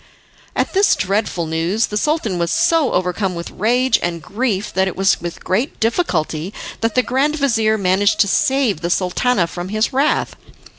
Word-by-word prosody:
At - - -1
this 395 +1 +4
dreadful 195 -3 -1
news 165 +8 0
the 210 - -7
Sultan 225 - 0
was 170 0 0
so 320 - +2
overcome 180 +1 -1
with 170 0 -6
rage 245 +5 +2
and 175 -1 -2
grief 210 +3 -2
that 190 +1 +1
it 190 - -4
was 195 0 +2
with 175 0 -6
great 230 +10 -1
difficulty 185 - -1 0.2
that 225 -1 -1
the 255 - +3
grand 275 +5 0
vizir 225 -7 +1
managed 200 +1 +2
to 200 - +3
save 250 - +1
the 170 - -2
Sultana 185 +3 +1
from 175 +2 -6
his 215 +5 0
wrath. 280 +3 +1
205 Hz, 170 wpm, -18 LUFS, 180-250 Hz, 0.2 s, this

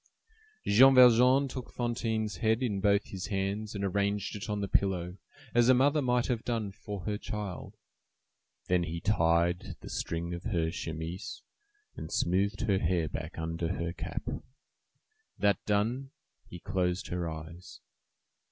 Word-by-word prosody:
Jean 130 +6 +7
Valjean 125 +2 +7
took 130 -1 -7
Fantine's 110 -4 -2
head 110 +5 +1
in 100 -6 -1
both 100 0 +3
his 95 -2 -5
hands, 100 +1 -2
and 100 - -3
arranged 100 +2 0
it 105 +2 -6
on 105 0 -1
the 100 - -2
pillow 90 -2 0 0.4
as 120 +1 +4
a 130 - +7
mother 145 +4 +3
might 125 -2 +2
have 120 -3 -1
done 115 -4 -2
for 100 0 -7
her 105 +2 -3
child; 105 -4 -6 0.9
then 90 -1 +2
he 85 0 -3
tied 85 -2 +1
the - - -9
string 85 +1 -3
of 85 +2 -7
her 85 -7 0
chemise, 85 - -5 0.5
and - - -7
smoothed 100 +3 +1
her 100 -5 +2
hair 85 -2 +1
back - - -6
under 80 +1 -2
her 85 0 -3
cap. - - -5 1.1
That 100 -1 +2
done, 115 +6 0 0.4
he 90 - -8
closed 90 +1 -1
her 90 -1 -2
eyes. 80 -4 -9
100 Hz, 150 wpm, -30 LUFS, 85-115 Hz, 1.1 s, Jean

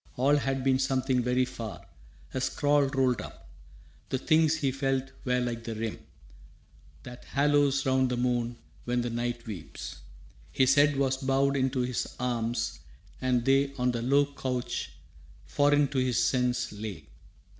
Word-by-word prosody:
All 140 +4 +4
had 135 -1 -1
been 130 -1 +3
something 130 -1 +1
very 125 +1 +2
far, 115 -7 -7 0.5
a 130 - -2
scroll 145 +1 +2
Rolled 130 -3 +1
up. - - -11 0.6
The 130 - 0
things 160 +3 +3
he 140 -4 0
felt 135 0 -1
were 125 0 +2
like 120 -2 -3
the 115 -1 -5
rim 110 0 -4 1.0
That 125 0 -10
haloes 145 -1 +2
round 130 -1 +2
the 125 - -1
moon 120 -1 0 0.3
when 120 0 0
the 120 0 -3
night 120 0 -3
weeps. 100 -8 -7 0.5
His 130 0 +4
head 145 0 +4
was 135 -1 +1
bowed 135 +1 +1
into 130 -1 +1
his 125 -1 -3
arms, 120 -3 -2 0.4
and 125 -2 +1
they 135 +1 +3
On 125 -1 +1
the 120 -1 -3
low 140 +4 +3
couch, 125 -3 -3 0.6
foreign 145 - +3
to 140 - -1
his 130 -2 +1
sense, 125 0 +1
lay. 105 -5 -7
130 Hz, 155 wpm, -28 LUFS, 120-135 Hz, 1.0 s, All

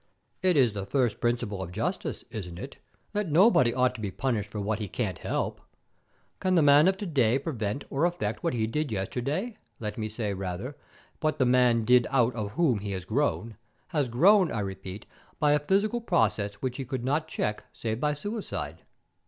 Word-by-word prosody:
"It 185 -3 +3
is 125 -6 +4
the 100 -2 -5
first 125 -3 +1
principle 120 -5 -1
of 90 -2 -5
justice, - - -3
isn't 90 -5 -6
it, - - -8 0.4
that 205 -6 -1
nobody 160 - +5
ought 125 +1 +2
to 120 - -8
be 105 - -2
punished 110 -1 -2
for 105 - -5
what 105 +2 -1
he 105 - -3
can't 95 -3 -3
help? - - -2 0.8
Can 185 0 +1
the 165 - +5
man 145 +3 +7
of 190 0 +2
to 205 - -5
day 130 - +2
prevent 130 -4 -3
or 140 +5 +2
affect 175 0 -2
what 170 -7 0
he 110 -2 +1
did 145 +4 -2
yesterday, 140 - -2 0.2
let 110 +1 -4
me 110 0 -2
say, 105 -2 -3
rather, 95 +8 -4 0.4
what 155 -1 0
the 130 - +3
man 125 -2 +4
did 125 0 +5
out 125 -3 +3
of 105 -3 -4
whom 135 -9 +2
he 100 0 -4
has 95 -2 -5
grown 115 -2 -1 0.3
has 145 -7 0
grown, 180 - +5
I 110 - -1
repeat, 95 0 -6 0.3
by 150 -2 +4
a 150 - +4
physical 200 +9 +1
process 105 - +1
which 125 +3 -4
he 135 - -4
could 130 -1 -4
not 150 +4 0
check 105 -8 -2
save 110 0 -3
by 150 +1 +1
suicide. 205 +8 -5
125 Hz, 195 wpm, -28 LUFS, 105-150 Hz, 0.8 s, man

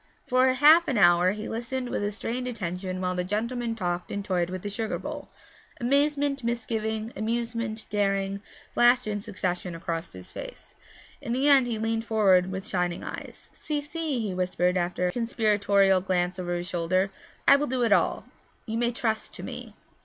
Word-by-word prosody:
For 255 +1 +3
half 310 +6 +6
an 265 - 0
hour 175 -2 +5
he 215 +1 -6
listened 245 +2 -3
with 205 -2 -1
strained 240 +4 -4
attention 185 -5 -4
while 180 0 0
the 180 0 -1
gentleman 230 +4 -2
talked 175 -4 -3
and 200 0 -3
toyed 180 -3 0
with 185 0 -5
the 205 - -3
sugar 220 +2 -2
bowl. - - -7 0.5
Amazement, 280 +1 +1
misgiving, 220 -1 -2
amusement, 230 0 -2
daring, 195 -1 0 0.3
flashed 245 +1 +4
in 205 -1 -2
succession 185 -4 -3
across 165 0 -4
his 90 -1 -11
face; - - -9 0.5
in 235 - -3
the 265 +3 +1
end 275 -3 +6
he 230 -2 -2
leaned 225 +1 -1
forward 190 -5 +3
with 190 0 -5
shining 180 -1 -1
eyes. - - -8
'Si, 300 -1 -3
si,' 295 -2 -3
he 205 -4 -2
whispered 180 0 0
after 180 0 0
a 180 - +1
conspiratorial 205 -4 +2
glance 180 0 0
over 175 -1 -2
his 175 0 -4
shoulder, 185 +2 0 0.4
'I 280 - +8
will 295 +1 -1
do 255 -1 0
it 230 - +2
all; - - +2 0.4
you 225 0 -2
may 240 0 +2
trust 220 -2 -2
to - - -8
me.' - - -7
215 Hz, 175 wpm, -27 LUFS, 185-240 Hz, 0.5 s, I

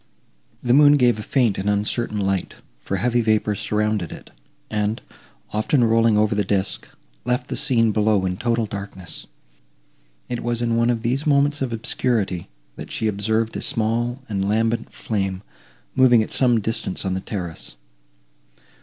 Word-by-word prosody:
The 120 - +3
moon 145 +1 +7
gave 125 -6 +3
a - - -3
faint 120 -5 +1
and 100 +2 -1
uncertain 105 +2 0
light, 95 -2 -1 0.2
for 95 - -3
heavy 120 +4 +1
vapours 110 -2 +1
surrounded 105 -4 -1
it, - - -11 0.4
and, 105 +1 -1 0.5
often 115 +5 +2
rolling 115 -1 +4
over 105 0 +3
the 105 0 +1
disk, 95 0 -1 0.4
left 125 +2 -1
the - - -2
scene 115 -6 +2
below 105 -2 +2
in 90 -1 -2
total 115 0 0
darkness. 100 -4 -6 1.0
It 120 -1 -3
was 120 0 -1
in 115 -1 0
one 115 +1 +2
of 115 -2 0
these 130 +6 -1
moments 145 0 +3
of 130 -3 -1
obscurity, 110 -5 -1 0.3
that - - -8
she 110 - -1
observed 110 +2 0
a - - -3
small 120 +3 0
and 100 -2 -1
lambent 115 +2 0
flame, 95 -3 -3 0.5
moving 125 -4 +5
at - - -8
some 120 -4 +3
distance 110 -3 -3
on 95 - 0
the 95 - -1
terrace. 90 - -5
110 Hz, 160 wpm, -22 LUFS, 100-120 Hz, 1.0 s, moon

